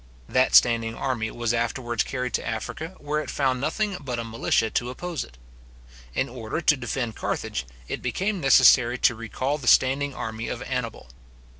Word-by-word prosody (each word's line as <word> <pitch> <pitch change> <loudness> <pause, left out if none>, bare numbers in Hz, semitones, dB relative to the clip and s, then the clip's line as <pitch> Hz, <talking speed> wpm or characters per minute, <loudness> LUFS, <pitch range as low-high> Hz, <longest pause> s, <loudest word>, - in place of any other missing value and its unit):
That 130 0 +2
standing 115 -1 +5
army 115 -4 -2
was 120 0 -2
afterwards 120 0 -1
carried 125 -1 -3
to - - 0
Africa, 155 +10 -5
where 150 +1 -2
it - - -7
found 130 -3 0
nothing 195 +6 -1
but 125 -4 -4
a 115 - -2
militia 115 -1 0
to 125 - -1
oppose 170 +4 -4
it. 60 0 -16 0.8
In - - +1
order 120 +3 -4
to 160 -2 +4
defend 120 -3 -3
Carthage, 60 +1 -3 0.2
it - - -4
became 190 - -1
necessary 125 -3 +6
to 125 - +3
recal 130 +6 -3
the 125 - -8
standing 135 +3 +4
army 110 0 -4
of - - -4
Annibal. - - -4
125 Hz, 170 wpm, -25 LUFS, 115-145 Hz, 0.8 s, necessary